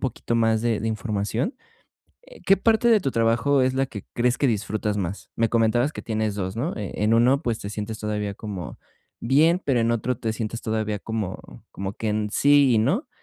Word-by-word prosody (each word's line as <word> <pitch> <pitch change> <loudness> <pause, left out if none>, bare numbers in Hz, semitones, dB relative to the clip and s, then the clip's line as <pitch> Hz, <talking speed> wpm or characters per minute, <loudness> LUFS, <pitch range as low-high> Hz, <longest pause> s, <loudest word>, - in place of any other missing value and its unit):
poquito 125 -2 -3
más 115 -1 +2
de 115 -2 0
de 115 - -3
información. 110 - -2 0.7
Eh, - - -17
¿qué 195 0 +5
parte 225 +3 +3
de 225 -3 +5
tu 135 - -1
trabajo 115 +4 +2
es 130 - +2
la 135 +1 0
que 105 -6 -9
crees 125 +1 +1
que 140 - +1
disfrutas 105 -2 -1
más? 95 +1 -5
Me 115 0 +2
comentabas 120 +5 +2
que - - -6
tienes 110 -2 -2
2, 95 -2 -3
¿no? 135 +11 -3
Eh, 105 -3 -5
en 110 +2 +3
1, 125 +4 +4
pues, 120 -7 -2
te 100 - -6
sientes 105 +1 -5
todavía 105 -1 -3
como 95 -6 -7 0.4
bien, 160 +9 +3
pero 130 -4 +2
en 115 0 +2
otro 120 +1 -1
te 110 -1 -2
sientes 115 0 -4
todavía 110 -1 -2
como 105 -3 -4 0.3
como 95 +1 -5
que 110 - -3
en 105 0 -1
sí 140 0 +4
y - - +4
no, 170 - 0
115 Hz, 210 wpm, -24 LUFS, 105-130 Hz, 0.7 s, qué